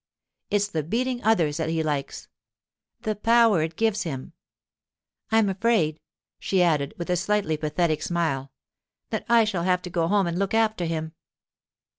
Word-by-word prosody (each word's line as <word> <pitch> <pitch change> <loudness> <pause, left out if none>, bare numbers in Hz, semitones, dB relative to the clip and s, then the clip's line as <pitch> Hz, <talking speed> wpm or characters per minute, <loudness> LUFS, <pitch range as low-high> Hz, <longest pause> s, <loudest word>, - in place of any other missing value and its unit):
It's 205 0 +1
the 165 -6 -2
beating 245 - -2
others 170 -9 +2
that 160 -1 -2
he 160 0 0
likes—the 150 +7 -6
power 230 -4 +4
it 160 +1 -3
gives 220 0 +1
him. 135 -8 -5 1.0
I'm 220 -1 +4
afraid,' 195 -6 +1 0.4
she 190 -2 +1
added, 150 -5 +1
with 175 +1 -4
a - - +3
slightly 190 -2 0
pathetic 155 +1 0
smile, 140 -6 -1 0.6
'that - - -3
I 235 -1 +6
shall 205 -5 -1
have 180 0 +1
to 180 - -7
go 165 -1 0
home 200 +1 +2
and 170 +1 -2
look 200 +2 0
after 220 -5 +1
him. 160 -1 -3
180 Hz, 155 wpm, -25 LUFS, 160-210 Hz, 1.0 s, I